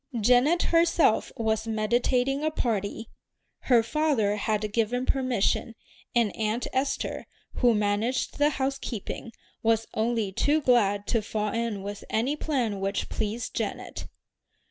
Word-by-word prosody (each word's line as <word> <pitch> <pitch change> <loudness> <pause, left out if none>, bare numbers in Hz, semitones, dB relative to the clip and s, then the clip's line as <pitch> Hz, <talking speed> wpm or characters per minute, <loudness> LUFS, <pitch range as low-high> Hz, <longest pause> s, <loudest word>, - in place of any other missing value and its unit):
Janet 250 +10 +4
herself 335 -7 +3
was 220 0 0
meditating 245 +5 +1
a 310 - +2
party. 225 -5 -2 0.5
Her 240 -3 +5
father 235 -6 +1
had 210 0 -1
given 235 +3 0
permission, 250 -3 0 0.4
and 230 -4 +2
Aunt 220 +2 -1
Esther, 265 +2 -2 0.3
who 240 -3 +4
managed 210 +7 0
the 290 0 +5
housekeeping, 265 -5 -4 0.3
was 225 0 +2
only 220 -2 0
too 290 +10 +2
glad 205 -7 +2
to 230 +1 +1
fall 210 0 -2
in 230 -4 -2
with 205 0 -6
any 250 +7 0
plan 250 -10 -1
which 195 +1 -2
pleased 220 +2 -3
Janet. - - -4
230 Hz, 125 wpm, -27 LUFS, 215-260 Hz, 0.5 s, Her